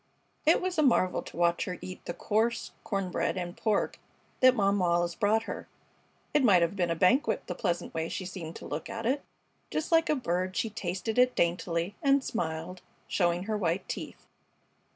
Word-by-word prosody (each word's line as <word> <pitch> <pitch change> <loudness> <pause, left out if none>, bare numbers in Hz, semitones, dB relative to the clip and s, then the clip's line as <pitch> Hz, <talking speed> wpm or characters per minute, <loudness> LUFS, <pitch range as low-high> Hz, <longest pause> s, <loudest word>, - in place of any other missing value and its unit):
It 320 - +6
was 365 -3 -1
a - - +6
marvel 235 -10 +3
to - - -11
watch 170 0 +2
her 180 -2 -4
eat 185 0 -9
the 175 - -3
coarse 225 +2 0
corn 195 -4 -2
bread 185 - 0
and 175 -1 -4
pork 215 -3 0 0.4
that 255 0 +6
Mom 200 -2 +2
Wallis 175 -1 +2
brought 215 +5 +2
her. - - -6 0.7
It 295 -2 +4
might 190 -8 +6
have 170 +4 0
been 175 -3 0
a 165 - +1
banquet, 215 - +2
the - - -4
pleasant 175 -4 -2
way 160 0 -2
she 190 -1 -4
seemed 175 -3 -7
to - - -9
look 150 +1 -5
at - - -5
it. 270 +4 +1 0.5
Just 310 +2 -2
like 330 0 +4
a 305 - +4
bird 185 -7 -1
she 225 - 0
tasted 205 +3 -2
it 250 0 +4
daintily, 170 +1 0
and 275 -2 +4
smiled, 170 -4 -3 0.3
showing 175 -1 +1
her 215 +2 -2
white 175 0 -1
teeth. - - -6
185 Hz, 195 wpm, -29 LUFS, 175-230 Hz, 0.7 s, It